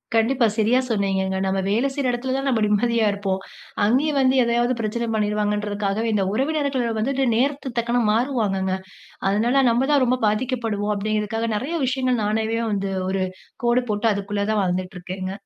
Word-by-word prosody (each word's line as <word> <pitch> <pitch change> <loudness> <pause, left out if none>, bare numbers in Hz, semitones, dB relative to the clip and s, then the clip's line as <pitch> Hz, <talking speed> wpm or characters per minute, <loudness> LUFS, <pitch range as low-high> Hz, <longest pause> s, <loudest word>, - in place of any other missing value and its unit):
கண்டிப்பா. 235 +2 +3
சரியா 225 +4 +3
சொன்னீங்கங்க. 195 -3 0
நம்ம 190 0 0
வேலை 230 +7 +2
செய்ற 270 -2 0
எடத்துல 255 +2 -2
தான் 270 0 -2
நம்ம 230 -4 +1
நிம்மதியா 225 +2 +2
இருப்போம். 195 -1 -2 0.4
அங்கேயும் 275 +6 +2
வந்து 265 0 +3
எதையாவது 240 +1 +1
பிரச்சனை 230 +2 -2
பண்ணிடுவாங்கன்றதுக்காகவே, 210 0 -1
இந்த 200 -2 +1
உறவினர்கள் 280 -1 0
வந்துட்டு 270 +4 0
நேரத்துக்கு 265 -1 -1
தக்கன 240 +1 +1
மாறுவாங்கங்க. 210 -6 0 0.5
அதனால, 235 +7 +2
நம்ம 245 +4 +2
தான் 285 -3 +4
ரொம்ப 250 +1 +2
பாதிக்கப்படுவோம் 215 -2 -1
அப்படிங்கிறதுக்காக, 215 +2 -1
நெறைய 280 +11 -2
விஷயங்கள் 255 -2 0
நானாவே 220 +2 0
வந்து, 195 -1 -1 0.2
ஒரு 190 0 0 0.4
கோடு 240 +1 +3
போட்டு 210 +2 +1
அதுக்குள்ள 200 0 -2
தான் 215 -2 +2
வாழ்ந்துட்டு 185 +1 -2
இருக்கேங்க. 185 +1 -5
225 Hz, 150 wpm, -22 LUFS, 205-255 Hz, 0.5 s, தான்